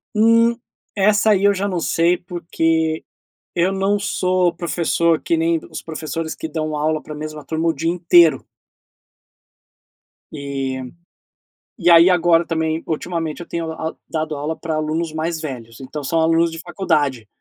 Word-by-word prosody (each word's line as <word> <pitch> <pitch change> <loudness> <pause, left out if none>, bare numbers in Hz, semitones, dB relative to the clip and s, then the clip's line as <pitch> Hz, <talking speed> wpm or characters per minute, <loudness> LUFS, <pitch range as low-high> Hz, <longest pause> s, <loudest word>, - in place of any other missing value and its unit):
Hum, 230 +2 +4 0.4
essa 205 +1 +3
aí 195 -2 +2
eu 200 0 +5
já 200 +1 -2
não 185 -3 -1
sei, 170 +2 +2
porque 165 -2 -1 0.5
eu 175 +2 +2
não 195 +1 +1
sou 185 -3 +1
professor 170 -1 +1
que 170 - 0
nem 165 0 +1
os - - -7
professores 160 0 -5
que - - -5
dão 155 -1 -3
aula 155 +1 0
pra 150 - -9
mesma 155 0 -7
turma 160 +4 -1
o - - +1
dia 165 +3 -1
inteiro. 170 -1 +4 1.9
E 135 -2 -4 1.0
e 175 -3 +3
aí 170 +2 +8
agora 170 -1 +3
também, 160 -1 -1
ultimamente 165 0 -3
eu 175 - -7
tenho 165 -1 -3
aul 160 0 -5
dado 155 -1 -3
aula 150 +3 -3
pra 160 -1 -3
alunos 155 +1 -2
mais 160 +1 -2
velhos, 120 -6 -7
então 140 +2 -7
são 165 +4 +1
alunos 165 +1 +3
de 165 - -7
faculdade. 150 - -1
165 Hz, 155 wpm, -20 LUFS, 155-175 Hz, 1.9 s, aí